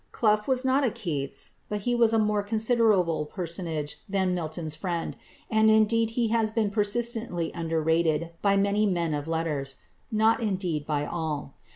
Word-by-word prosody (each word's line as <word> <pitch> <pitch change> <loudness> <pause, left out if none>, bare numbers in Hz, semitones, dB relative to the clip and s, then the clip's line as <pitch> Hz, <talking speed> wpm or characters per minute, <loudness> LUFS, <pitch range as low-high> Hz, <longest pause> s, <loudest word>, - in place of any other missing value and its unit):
Clough 210 -2 +2
was 260 -1 0
not 265 +2 +3
a 255 - +3
Keats, 150 -10 -4 0.2
but 210 -1 -2
he 245 +4 0
was 235 -2 +4
a 225 - +3
more 210 -1 +2
considerable 210 -7 +2
personage 165 -3 -3
than 190 -2 +1
Milton's 160 -2 -3
friend, 170 +1 -3 0.3
and 220 0 +4
indeed 220 +1 +4
he 235 -2 +2
has 225 -1 +2
been 220 -2 0
persistently 215 -4 0
underrated 165 0 0
by 200 -1 +3
many 200 +2 +2
men 170 -4 0
of 145 +1 -3
letters. 155 -4 -2 0.4
Not 220 +1 +3
indeed 185 -8 -2
by 145 -1 0
all. 150 -4 -4
195 Hz, 160 wpm, -27 LUFS, 160-220 Hz, 0.4 s, was